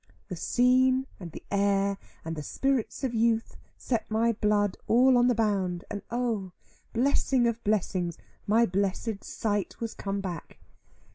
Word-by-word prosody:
The 180 Hz, -, -4 dB
scene, 255 Hz, +6 st, +3 dB
and 175 Hz, -4 st, -8 dB
the -, -, -10 dB
air, 200 Hz, 0 st, +1 dB, 0.3 s
and 165 Hz, 0 st, -3 dB
the 150 Hz, -, -5 dB
spirits 270 Hz, -, -1 dB
of 255 Hz, -3 st, -1 dB
youth 225 Hz, 0 st, +1 dB, 0.2 s
set 235 Hz, -4 st, -2 dB
my 225 Hz, +2 st, +2 dB
blood 205 Hz, -2 st, +1 dB
all 255 Hz, +3 st, +5 dB
on 245 Hz, 0 st, +5 dB
the 245 Hz, -, +3 dB
bound, 195 Hz, -5 st, 0 dB
and 205 Hz, -1 st, -4 dB
oh, 230 Hz, -6 st, -2 dB, 0.4 s
blessing 260 Hz, 0 st, +2 dB
of 235 Hz, 0 st, -1 dB
blessings, 185 Hz, -4 st, 0 dB, 0.3 s
my 225 Hz, +3 st, +4 dB
blessed 200 Hz, +2 st, -2 dB
sight 205 Hz, -3 st, -2 dB
was 230 Hz, -1 st, -4 dB
come 200 Hz, 0 st, -3 dB
back. 180 Hz, -5 st, -6 dB
215 Hz, 150 wpm, -28 LUFS, 195-240 Hz, 0.4 s, all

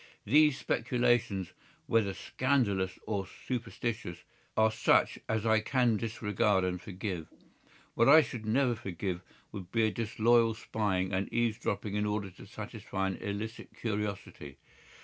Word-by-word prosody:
These 150 Hz, +4 st, +5 dB
speculations, 120 Hz, -6 st, +1 dB, 0.3 s
whether 105 Hz, -4 st, +1 dB
scandalous 100 Hz, -9 st, 0 dB
or 100 Hz, -3 st, -2 dB
superstitious, 115 Hz, -6 st, -4 dB, 0.4 s
are 110 Hz, 0 st, +5 dB
such 110 Hz, -, +3 dB
as 110 Hz, 0 st, 0 dB
I 110 Hz, -1 st, +4 dB
can 120 Hz, 0 st, +2 dB
disregard 105 Hz, -2 st, +1 dB
and 90 Hz, -1 st, -2 dB
forgive. 95 Hz, -5 st, -5 dB, 0.7 s
What 115 Hz, +3 st, +4 dB
I 155 Hz, +2 st, +9 dB
should 120 Hz, -5 st, -6 dB
never 125 Hz, +2 st, +3 dB
forgive 95 Hz, -4 st, -4 dB, 0.3 s
would 95 Hz, -3 st, -8 dB
be 115 Hz, -1 st, +2 dB
a 110 Hz, -, +3 dB
disloyal 115 Hz, 0 st, +2 dB
spying 95 Hz, -5 st, -1 dB
and 95 Hz, +1 st, -1 dB
eavesdropping 110 Hz, -3 st, -1 dB
in 105 Hz, 0 st, 0 dB
order 105 Hz, -2 st, -2 dB
to 90 Hz, -, -14 dB
satisfy 95 Hz, 0 st, -4 dB
an 95 Hz, -, -4 dB
illicit 105 Hz, +3 st, -5 dB
curiosity. 100 Hz, -, -4 dB
110 Hz, 130 wpm, -31 LUFS, 95-115 Hz, 0.7 s, I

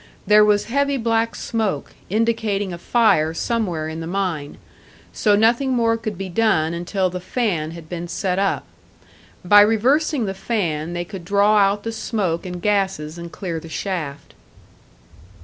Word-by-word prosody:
There 210 Hz, 0 st, +6 dB
was 210 Hz, -1 st, +3 dB
heavy 280 Hz, +3 st, 0 dB
black 230 Hz, -1 st, 0 dB
smoke, 210 Hz, -10 st, -2 dB, 0.2 s
indicating 215 Hz, -2 st, 0 dB
a 170 Hz, -, -7 dB
fire 170 Hz, -8 st, +2 dB
somewhere 180 Hz, -8 st, -1 dB
in 160 Hz, +1 st, -5 dB
the 165 Hz, -, -5 dB
mine; 175 Hz, -6 st, -3 dB, 0.6 s
so 210 Hz, -2 st, +3 dB
nothing 235 Hz, +5 st, +3 dB
more 230 Hz, -2 st, +2 dB
could 215 Hz, -4 st, -5 dB
be 195 Hz, 0 st, -4 dB
done 175 Hz, -5 st, +1 dB
until 180 Hz, +2 st, -1 dB
the 180 Hz, -, -4 dB
fan 180 Hz, -5 st, -1 dB
had 165 Hz, -1 st, -10 dB
been 175 Hz, 0 st, -5 dB
set 185 Hz, +1 st, -1 dB
up. 195 Hz, -1 st, 0 dB, 0.8 s
By 205 Hz, +3 st, +8 dB
reversing 250 Hz, +6 st, +2 dB
the 195 Hz, -, -3 dB
fan, 175 Hz, -6 st, -2 dB
they 175 Hz, 0 st, -3 dB
could 190 Hz, -1 st, -8 dB
draw 205 Hz, +4 st, +3 dB
out 200 Hz, +1 st, +2 dB
the 225 Hz, -, -3 dB
smoke 200 Hz, -6 st, -2 dB
and 180 Hz, 0 st, -5 dB
gases 190 Hz, -6 st, 0 dB
and 170 Hz, 0 st, -8 dB
clear 175 Hz, -4 st, -4 dB
the 165 Hz, -, -11 dB
shaft. 160 Hz, -6 st, -5 dB
195 Hz, 160 wpm, -21 LUFS, 170-225 Hz, 0.8 s, By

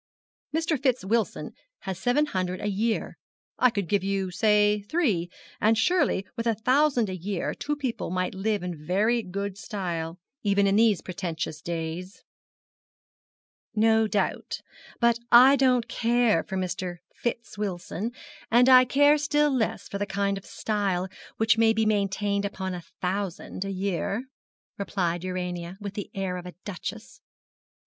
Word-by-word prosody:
Mr. 320 Hz, -3 st, 0 dB
Fitz 255 Hz, -7 st, +1 dB
Wilson 225 Hz, +2 st, -1 dB, 0.3 s
has 190 Hz, -2 st, -5 dB
seven 250 Hz, +7 st, +2 dB
hundred 185 Hz, -7 st, -2 dB
a -, -, -5 dB
year. 215 Hz, +3 st, -1 dB, 0.4 s
I 250 Hz, -, +6 dB
could 200 Hz, -6 st, -2 dB
give 200 Hz, 0 st, +1 dB
you 195 Hz, -1 st, -1 dB
say 210 Hz, +1 st, +3 dB
three; 215 Hz, -, +1 dB, 0.3 s
and 220 Hz, +1 st, +4 dB
surely 225 Hz, -, +2 dB
with 230 Hz, 0 st, -2 dB
a 230 Hz, -, +2 dB
thousand 255 Hz, +1 st, +3 dB
a 185 Hz, -, -4 dB
year 185 Hz, +1 st, -3 dB
two 295 Hz, -, -3 dB
young -, -, -4 dB
people 260 Hz, -5 st, -3 dB
might 185 Hz, +1 st, -1 dB
live 205 Hz, +1 st, -1 dB
in 170 Hz, -4 st, -5 dB
very 210 Hz, +8 st, +2 dB
good 200 Hz, 0 st, -5 dB
style 175 Hz, -6 st, -4 dB, 0.2 s
even 200 Hz, -2 st, +2 dB
in 195 Hz, 0 st, +3 dB
these 220 Hz, -4 st, +4 dB
pretentious 170 Hz, -4 st, -4 dB
days.' 170 Hz, +3 st, -5 dB, 1.5 s
'No 220 Hz, 0 st, +4 dB
doubt. 205 Hz, -2 st, -1 dB, 0.4 s
But 235 Hz, -1 st, +3 dB
I 255 Hz, +3 st, +9 dB
don't 255 Hz, -3 st, +3 dB
care 235 Hz, -1 st, +2 dB
for 190 Hz, -, -4 dB
Mr. 180 Hz, -1 st, -3 dB, 0.2 s
Fitz 235 Hz, -1 st, -4 dB
Wilson, 205 Hz, +1 st, -3 dB, 0.4 s
and 240 Hz, +2 st, +5 dB
I 255 Hz, -1 st, +8 dB
care 290 Hz, +4 st, +4 dB
still 295 Hz, 0 st, +2 dB
less 220 Hz, -4 st, -1 dB
for 200 Hz, -, -5 dB
the 205 Hz, -, -1 dB
kind 200 Hz, 0 st, 0 dB
of 195 Hz, -, -9 dB
style 195 Hz, -4 st, -1 dB, 0.3 s
which 225 Hz, 0 st, +3 dB
can 225 Hz, 0 st, +5 dB
be 220 Hz, 0 st, +2 dB
maintained 200 Hz, -1 st, +1 dB
upon 190 Hz, -2 st, -3 dB
a 175 Hz, -, -5 dB, 0.2 s
thousand 185 Hz, 0 st, -3 dB
a 195 Hz, -, -3 dB
year,' 195 Hz, +4 st, -2 dB, 0.6 s
replied 175 Hz, -4 st, -1 dB
Urania, 180 Hz, -1 st, -4 dB
with 200 Hz, -2 st, -6 dB
the 205 Hz, -, -5 dB
air 190 Hz, -2 st, -2 dB
of 180 Hz, 0 st, -7 dB
a 180 Hz, -, -9 dB
duchess. 200 Hz, -5 st, -7 dB
200 Hz, 155 wpm, -26 LUFS, 185-230 Hz, 1.5 s, I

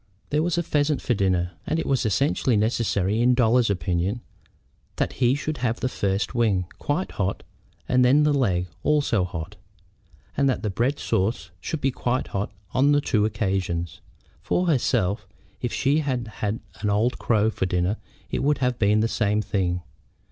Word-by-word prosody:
There 150 Hz, +1 st, +2 dB
was 170 Hz, +1 st, 0 dB
a 170 Hz, -, +1 dB
pheasant 150 Hz, -1 st, +1 dB
for 125 Hz, -, 0 dB
dinner, 95 Hz, -4 st, +1 dB, 0.2 s
and 155 Hz, -, 0 dB
it 165 Hz, -, -1 dB
was 130 Hz, -4 st, +1 dB
essentially 130 Hz, 0 st, +2 dB
necessary, 105 Hz, -1 st, +1 dB
in 125 Hz, +1 st, +4 dB
Dolly's 120 Hz, -1 st, +3 dB
opinion, 90 Hz, +4 st, -1 dB, 0.7 s
that -, -, -1 dB
he 125 Hz, 0 st, +2 dB
should 150 Hz, +1 st, -3 dB
have 120 Hz, -2 st, 0 dB
first 100 Hz, -5 st, -1 dB
the 120 Hz, -, -6 dB
wing, 100 Hz, -6 st, +2 dB
quite 155 Hz, +6 st, -1 dB
hot, 95 Hz, -1 st, -2 dB, 0.4 s
and 125 Hz, 0 st, +4 dB
then 135 Hz, +4 st, +5 dB
the 150 Hz, 0 st, +3 dB
leg, 95 Hz, -11 st, +1 dB, 0.2 s
also 145 Hz, -9 st, +2 dB
hot, 90 Hz, +2 st, -6 dB, 0.8 s
and 140 Hz, -1 st, +3 dB
that 130 Hz, -, -1 dB
the 105 Hz, -, -1 dB
bread 125 Hz, +8 st, 0 dB
sauce 100 Hz, +6 st, -1 dB
should 160 Hz, -, -4 dB
be 135 Hz, -, +2 dB
quite 125 Hz, 0 st, -1 dB
hot 100 Hz, +1 st, -2 dB, 0.2 s
on 140 Hz, +3 st, +4 dB
the 145 Hz, -, +4 dB
two 110 Hz, -7 st, +1 dB
occasions. 95 Hz, -5 st, -2 dB, 0.4 s
For 180 Hz, -, 0 dB
herself, 110 Hz, -, +1 dB, 0.3 s
if 120 Hz, -, -2 dB
she 140 Hz, +3 st, +2 dB
had 130 Hz, -6 st, -2 dB
had 105 Hz, +1 st, -2 dB, 0.2 s
an 105 Hz, -, -1 dB
old 110 Hz, +5 st, +1 dB
crow 110 Hz, -1 st, +2 dB
for 95 Hz, -, -1 dB
dinner 90 Hz, +4 st, 0 dB, 0.3 s
it -, -, -1 dB
would 145 Hz, +1 st, +2 dB
have 125 Hz, -2 st, 0 dB
been 105 Hz, +1 st, +3 dB
the 115 Hz, -, +2 dB
same 105 Hz, -2 st, 0 dB
thing. 90 Hz, -4 st, -1 dB
115 Hz, 175 wpm, -24 LUFS, 100-135 Hz, 0.8 s, then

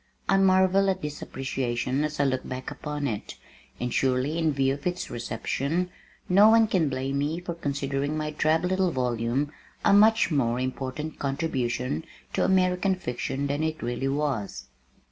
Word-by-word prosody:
I -, -, +4 dB
marvel 190 Hz, 0 st, +4 dB
at 190 Hz, -3 st, -1 dB
this 150 Hz, 0 st, -5 dB
appreciation 130 Hz, 0 st, -2 dB
as 150 Hz, -1 st, -3 dB
I -, -, +4 dB
look 130 Hz, -2 st, 0 dB
back 130 Hz, 0 st, -5 dB
upon 150 Hz, -1 st, -4 dB
it, 110 Hz, -7 st, -4 dB, 0.4 s
and 125 Hz, 0 st, -2 dB
surely 135 Hz, +5 st, +1 dB
in 160 Hz, -2 st, +2 dB
view 135 Hz, -1 st, +1 dB
of 140 Hz, +5 st, -4 dB
its 180 Hz, 0 st, -3 dB
reception, 140 Hz, +9 st, -2 dB, 0.4 s
no 200 Hz, +4 st, +7 dB
one 225 Hz, 0 st, +6 dB
can 180 Hz, -8 st, +1 dB
blame 135 Hz, +1 st, -2 dB
me 150 Hz, +4 st, -1 dB
for 175 Hz, -1 st, -5 dB
considering 140 Hz, -1 st, -2 dB
my 155 Hz, 0 st, -2 dB
drab 155 Hz, +2 st, +1 dB
little 185 Hz, 0 st, +2 dB
volume 125 Hz, 0 st, -1 dB, 0.3 s
a -, -, +6 dB
much 215 Hz, -1 st, +5 dB
more 125 Hz, -5 st, +1 dB
important 130 Hz, +4 st, -4 dB
contribution 125 Hz, -, -1 dB, 0.3 s
to -, -, +1 dB
American 185 Hz, 0 st, +2 dB
fiction 135 Hz, -3 st, -3 dB
than 140 Hz, +2 st, -1 dB
it 160 Hz, -3 st, -2 dB
really 120 Hz, +3 st, -2 dB
was. 130 Hz, -, -2 dB
145 Hz, 165 wpm, -26 LUFS, 130-175 Hz, 0.4 s, no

